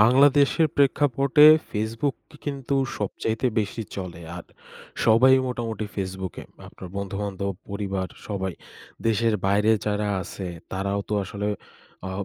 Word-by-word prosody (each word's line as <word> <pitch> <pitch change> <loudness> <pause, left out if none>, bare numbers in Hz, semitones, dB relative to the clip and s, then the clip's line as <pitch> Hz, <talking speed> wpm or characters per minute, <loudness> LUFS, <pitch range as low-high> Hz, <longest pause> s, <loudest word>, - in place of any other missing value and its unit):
বাংলাদেশের 140 +7 +5
প্রেক্ষাপটে 140 0 +4 0.3
Facebook 115 +6 -1
কি 155 - -15
কিন্তু 140 -2 -2 0.2
সবচাইতে 110 +4 -1
বেশি 105 +2 -3
চলে। 90 -3 -6 0.2
আর 90 - -8 0.6
সবাই 120 +4 +6
মোটামুটি 115 -4 -3
Facebook-এ, 95 -2 -5 0.2
আপনার 95 - -10
বন্ধু-বান্ধব, 100 0 -3 0.2
পরিবার 100 -2 -3 0.2
সবাই। 95 -2 -2 0.5
দেশের 115 0 +2
বাইরে 105 +2 +3 0.2
যারা 105 0 0
আছে 95 +1 -7 0.3
তারাও 100 +1 -1
তো 105 - -1
আসলে 105 +1 -3 0.6
আ - - -5
105 Hz, 120 wpm, -25 LUFS, 100-125 Hz, 0.6 s, সবাই